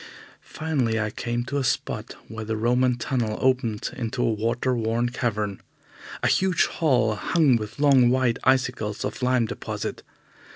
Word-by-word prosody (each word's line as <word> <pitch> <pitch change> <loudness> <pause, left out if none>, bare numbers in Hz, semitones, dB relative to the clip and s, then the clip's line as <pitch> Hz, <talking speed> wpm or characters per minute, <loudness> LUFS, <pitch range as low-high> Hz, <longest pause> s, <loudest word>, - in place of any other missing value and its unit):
Finally, 135 -8 -1
I 110 0 -1
came 120 +1 -3
to 140 +3 -2
a - - -1
spot 125 - -2
where 110 0 -6
the 110 0 -3
Roman 125 +2 +2
tunnel 120 -4 -1
opened 125 -5 0
into 120 0 -2
a 115 - +2
water 115 +4 0
worn 115 +1 0
cavern 105 -5 -2 0.6
a - - +4
huge 185 -2 +3
hall, 125 -8 +1
hung 145 - +2
with 110 +1 -4
long 135 -4 +5
white 125 -2 +1
icicles 125 -5 +1
of - - -5
lime 125 -1 +2
deposit. - - -5
120 Hz, 155 wpm, -25 LUFS, 110-130 Hz, 0.6 s, long